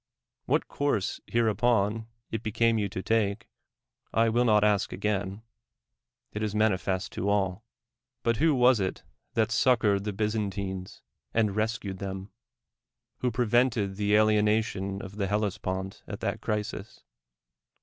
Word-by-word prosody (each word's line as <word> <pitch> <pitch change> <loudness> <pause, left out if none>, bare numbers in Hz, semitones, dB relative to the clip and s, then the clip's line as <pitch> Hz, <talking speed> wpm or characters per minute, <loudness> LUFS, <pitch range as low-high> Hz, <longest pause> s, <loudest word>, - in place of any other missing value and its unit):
What - - +1
course 140 -9 -1
hereupon 115 -1 +1 0.2
it 110 - -2
became 115 +1 +2
you 100 -1 -1
to 95 0 -5
take, 105 -1 0 0.6
I 115 0 +3
will 120 +2 +2
not 105 -2 +4
ask 105 -2 +2
again; 100 0 -2 0.9
it 105 - -3
is 105 -1 -2
manifest 95 -3 +1
to 100 - -2
all. 100 0 0 0.6
But 115 -1 +2
who 155 -1 +3
was 125 -2 +5
it 95 -1 -2 0.3
that 110 -1 +2
succored 110 -5 +3
the 105 - -1
Byzantines, 100 -3 -3 0.3
and 105 -3 +2
rescued 110 -3 -2
them 95 -1 -4
1 95 +2 -11 0.9
who 125 - +1
pre 120 +2 0
vented 115 -4 +2
the 105 0 +2
alienation 105 -2 +2
of 95 +2 -9
the 100 -2 0
ITellespont 95 -2 -2
at - - -6
that - - -2
crisis? 105 0 -4
105 Hz, 140 wpm, -28 LUFS, 100-115 Hz, 0.9 s, was